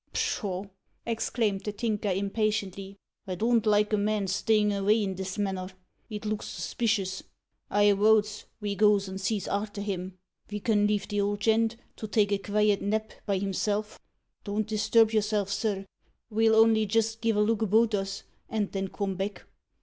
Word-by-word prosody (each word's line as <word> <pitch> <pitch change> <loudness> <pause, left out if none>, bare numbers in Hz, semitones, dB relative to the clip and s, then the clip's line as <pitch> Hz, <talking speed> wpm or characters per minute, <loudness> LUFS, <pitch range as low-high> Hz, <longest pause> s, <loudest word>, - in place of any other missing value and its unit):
"Pshaw!" 190 -3 -1 0.4
exclaimed 225 -3 -1
the 210 - -2
Tinker 210 -1 -2
impatiently; 200 0 -2 0.3
"I 185 - -3
don't 230 +3 +2
like 210 0 +3
a - - +4
man 205 0 0
stayin' 210 +2 +2
avay 205 +2 +2
in 190 -1 -2
this 190 +1 -5
manner. 190 -2 -2 0.4
It 215 -1 -6
looks 215 0 -2
suspicious. 195 +1 -1 0.5
I 205 0 +4
wotes 210 +1 +2
ve 205 -2 -2
goes 205 -1 +3
and 190 +1 -6
sees 200 0 -1
arter 205 0 -3
him. 185 -2 -4 0.3
Ve 210 0 -5
can 205 -1 +2
leave 210 -1 0
the 205 -1 0
old 205 +1 -1
gent 225 +1 +2 0.2
to 215 - -5
take 205 -1 +2
a 200 - +1
keviet 210 0 +1
nap 215 +2 -1 0.2
by 200 -2 +1
himself. 205 +2 -2 0.4
Don't 210 +1 -1
disturb 220 +1 +3
yourself, 210 -2 +1
sir. 200 -2 -1 0.5
Ve'll 220 +1 +3
only 220 -1 +5
jist 225 +1 0
giv' 225 -1 +1
a - - +1
look 220 +1 +1
about 220 +1 +3
us, 195 -1 -2 0.3
and 210 -3 -1
then 195 -1 -2
come 195 0 -3
back." 195 +2 -4
210 Hz, 165 wpm, -28 LUFS, 195-220 Hz, 0.5 s, only